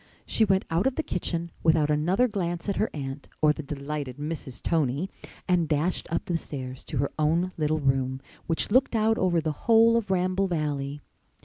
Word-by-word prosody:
She 225 - +2
went 190 -1 +2
out 170 +9 +2
of 265 - 0
the 320 - -1
kitchen 170 - -2
without 155 -2 +3
another 175 +11 +2
glance 175 -5 -3
at 200 - -1
her 215 - +1
aunt 135 -1 -6
or 155 -1 +4
the 155 - -6
delighted 140 -2 -5
Mrs. 150 -3 -5
Tony 155 +3 0 0.4
and 175 -4 +2
dashed 155 +4 0
up - - -1
the 175 - 0
stairs 130 -5 -6
to 150 - -4
her 140 +2 0
own 165 +4 +2
little 155 0 +1
room 130 -1 +1 0.3
which 165 +4 0
looked 255 +1 +3
out 220 0 +2
over 180 -2 +2
the 155 -1 -1 0.2
whole 230 0 +6
of 220 -4 -2
Ramble 185 +1 +1
Valley. 145 -4 -2
165 Hz, 190 wpm, -27 LUFS, 145-185 Hz, 0.4 s, whole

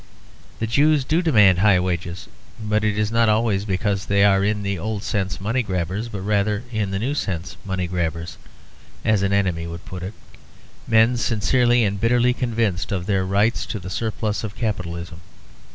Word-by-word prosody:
The 115 - -2
Jews 145 +5 +3
do 160 +5 +2
demand 105 - +5
high 100 -2 +5
wages, 90 +1 -3 0.3
but 105 0 0
it 105 -1 0
is 105 0 0
not 115 -1 +3
always 105 -2 +1
because 100 0 -1
they 100 0 +3
are 100 -1 +4
in 105 0 0
the 100 -2 -2
old 105 +2 -3
sense 95 -4 -2
money 115 +7 0
grabbers, 95 +2 -3
but 100 -4 -6
rather 105 +2 0
in 110 -4 -1
the 95 - -2
new 125 +8 -1
sense 90 - -3
money 95 -2 -2
grabbers 85 -1 -3 0.7
(as 110 -3 +3
an 100 0 +1
enemy 90 -4 0
would 85 +1 -8
put 90 -1 -7
it) 95 +4 -6 0.7
men 115 +2 +4
sincerely 120 +2 +2
and 100 -2 -1
bitterly 120 +1 +3
convinced 115 -7 -1
of 90 -3 -2
their 95 -2 +1
right 100 +5 +2
to - - -4
the 95 -1 -8
surplus 110 +1 -2
of 105 -2 -5
capitalism. 85 -6 -4
100 Hz, 180 wpm, -22 LUFS, 95-110 Hz, 0.7 s, demand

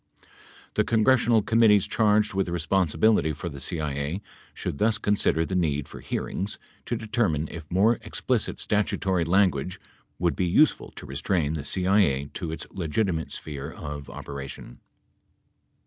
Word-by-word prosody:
The - - +2
congressional 115 -1 +3
committees 110 -3 +5
charged 105 -1 +2
with 95 -1 0
re 85 - -1
sponsibility 85 0 +2
for 85 +4 -5
the 70 -3 -9
CIA 75 +2 -3 0.3
should 70 - -5
thus 110 0 +2
consider 100 -6 +1
the 95 - -5
need 75 -6 0
for - - -10
hearings 100 +2 -3 0.3
to 120 - -1
determine 105 -9 0
if 80 -3 -9
more 105 +6 +3
explicit - - -2
statutory 95 -4 0
language 95 +1 +2 0.4
would 85 -1 +1
be 90 - 0
useful 145 - +3
to - - -9
restrain 75 +3 -1
the 75 -3 -4
CIA 90 -5 +2
to 85 -4 -4
its 80 -1 -5
legitimate 85 -1 -1
sphere 70 0 -5
of 75 -2 -7
operation. 70 -3 -8
90 Hz, 140 wpm, -26 LUFS, 75-105 Hz, 0.4 s, committees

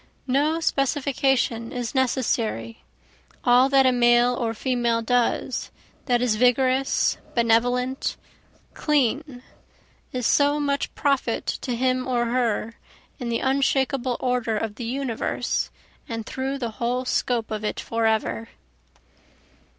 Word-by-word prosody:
No 290 +5 +1
specification 270 -5 0
is 245 -2 -4
necessary, 240 -3 -1 0.6
all 250 +2 +5
that 270 -1 +5
a 260 - +5
male 240 0 +4
or 230 -2 -2
female 240 -1 0
does, 245 +1 0 0.4
that 245 -1 +2
is 225 -4 +1
vigorous, 255 +2 +2 0.2
benevolent, 245 +3 +1 0.6
clean, 280 -2 0 0.7
is 250 -2 -3
so 290 +4 +3
much 280 -1 -1
profit 275 -5 0
to 245 - -3
him 255 +1 0
or 240 -2 +1
her, 230 -2 -1 0.4
In 245 -2 -4
the 230 - -1
unshakable 265 -2 +1
order 245 -3 0
of 220 -1 -3
the 235 +2 -7
universe 250 -1 -2 0.4
and 225 -2 -4
through 265 +3 -3
the 240 -4 -3
whole 250 +2 0
scope 235 -3 -1
of 215 0 -3
it 210 - -2
forever. 225 0 -1
250 Hz, 120 wpm, -24 LUFS, 230-265 Hz, 0.7 s, all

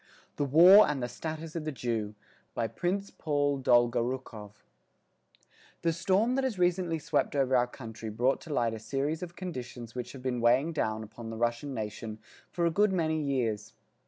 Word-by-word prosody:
_ - - -42
THE 145 - +1
WAR 175 +9 +8
AND 140 -4 -2
THE - - -1
STATUS 160 +5 -6
OF 165 - -3
THE 155 - -3
JEW 115 -5 -3 0.4
BY 115 -1 -1
PRINCE 190 - -2
PAUL 145 -2 0
DOLGORUKOV 120 -3 +1 1.3
The 165 -1 +2
storm 195 +8 +2
that 270 +1 0
has 255 -6 -1
recently 175 -2 +1
swept 150 - -1
over 135 -2 +2
our 125 0 +3
country 115 -3 -8
brought 120 +5 +1
to - - -12
light 120 -5 +1
a 110 - -5
series 140 +8 -2
of 175 -1 -7
conditions 125 -9 -7
which 125 -1 -6
have 130 -2 -10
been 125 -2 -1
weighing 130 +8 +3
down 110 -7 -1
upon 115 +1 -9
the 115 - -6
Russian 120 +4 -1
nation 110 0 -5 0.3
for 170 - -1
a 170 - +2
good 205 +4 +3
many 160 -4 0
years. 115 -7 -2
135 Hz, 185 wpm, -30 LUFS, 120-165 Hz, 1.3 s, WAR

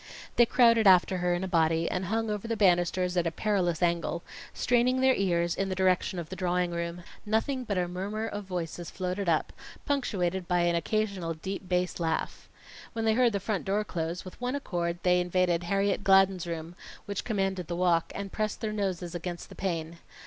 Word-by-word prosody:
They 240 - +5
crowded 230 -3 +5
after 185 0 +5
her 175 0 +1
in 175 - -3
a - - -2
body 165 -1 +2
and 185 +1 -2
hung 225 +3 -1
over 210 +2 -3
the 230 -1 -1
banisters 180 -1 +2
at 175 -1 +2
a - - -1
perilous 180 -3 0
angle, 170 0 0 0.3
straining 250 +1 +2
their 260 0 +5
ears 170 -4 +1
in 195 0 -2
the 185 - -2
direction 185 0 +1
of 165 -2 -5
the 190 - -6
drawing 180 -1 0
room. 170 +1 -4 0.2
Nothing 250 +5 0
but 200 -4 -2
a 180 -1 +1
murmur 200 +5 -3
of 205 -2 -5
voices 175 -2 -4
floated 185 0 -2
up, 160 -2 +1 0.3
punctuated 190 -10 -1
by 180 -1 +2
an 175 0 +2
occasional 185 -1 -1
deep 190 +3 -6
bass 180 -1 0
laugh. 165 -1 -2 0.4
When 225 -1 -2
they 220 - +4
heard 240 0 +4
the 200 - 0
front 200 0 -2
door 205 +2 0
close, 170 -2 -4
with 185 - -11
one 250 +2 -1
accord 175 -10 -2
they 180 -1 +4
invaded 180 -1 +1
Harriet 195 +2 +1
Gladden's 195 -2 +4
room, 165 0 -5 0.3
which 200 -2 -3
commanded 195 -5 -1
the 175 - -3
walk, 175 -2 +2
and 200 -1 -5
pressed 215 -1 -2
their 215 -2 -3
noses 185 -4 -2
against 175 0 -5
the - - -10
pane. 170 -3 -3
185 Hz, 200 wpm, -29 LUFS, 175-205 Hz, 0.4 s, They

